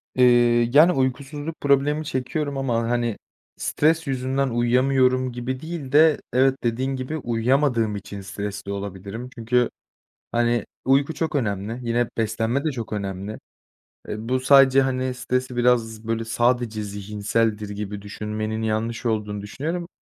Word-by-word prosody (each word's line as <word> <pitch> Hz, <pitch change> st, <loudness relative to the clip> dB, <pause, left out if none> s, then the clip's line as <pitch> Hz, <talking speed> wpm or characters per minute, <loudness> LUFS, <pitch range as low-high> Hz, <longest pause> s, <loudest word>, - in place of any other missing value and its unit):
Eee, 120 Hz, -1 st, +5 dB
yani, 155 Hz, +5 st, +7 dB
uykusuzluk 140 Hz, +3 st, -2 dB
problemi 145 Hz, +2 st, +2 dB
çekiyorum 140 Hz, +2 st, -2 dB
ama, 115 Hz, -4 st, 0 dB
hani, 120 Hz, -3 st, 0 dB, 0.4 s
stres 160 Hz, +1 st, +1 dB
yüzünden 135 Hz, +1 st, 0 dB
uyuyamıyorum 130 Hz, +2 st, +2 dB
gibi 125 Hz, +2 st, -4 dB
değil 160 Hz, -3 st, -6 dB
de 155 Hz, +1 st, +5 dB
evet, 130 Hz, +1 st, +4 dB
dediğin 130 Hz, +3 st, 0 dB
gibi, 130 Hz, +4 st, -4 dB
uyuyamadığım 120 Hz, -2 st, +1 dB
için 100 Hz, 0 st, -7 dB
stresli 100 Hz, +1 st, -5 dB
olabilirim. 100 Hz, +4 st, -6 dB
Çünkü, 120 Hz, +1 st, +1 dB, 0.6 s
hani, 120 Hz, -1 st, +1 dB, 0.2 s
uyku 140 Hz, +4 st, +3 dB
çok 160 Hz, -2 st, -2 dB
önemli, 110 Hz, -3 st, -1 dB
yine 120 Hz, 0 st, +1 dB
beslenme 115 Hz, +4 st, 0 dB
de 155 Hz, -, +1 dB
çok 120 Hz, -6 st, -6 dB
önemli. 100 Hz, 0 st, -4 dB, 0.7 s
Eee, -, -, -3 dB
bu 130 Hz, 0 st, +2 dB
sadece, 135 Hz, 0 st, +6 dB
hani, 130 Hz, -1 st, -1 dB
stresi 125 Hz, 0 st, -2 dB
biraz, 115 Hz, -3 st, +1 dB
böyle, 115 Hz, 0 st, -1 dB
sadece 120 Hz, -1 st, 0 dB
zihinseldir 105 Hz, +1 st, -1 dB
gibi 105 Hz, 0 st, -5 dB
düşünmenin 110 Hz, +2 st, -4 dB
yanlış 110 Hz, +2 st, -2 dB
olduğunu 105 Hz, -3 st, -1 dB
düşünüyorum. 160 Hz, -, -4 dB
120 Hz, 130 wpm, -23 LUFS, 110-135 Hz, 0.7 s, yani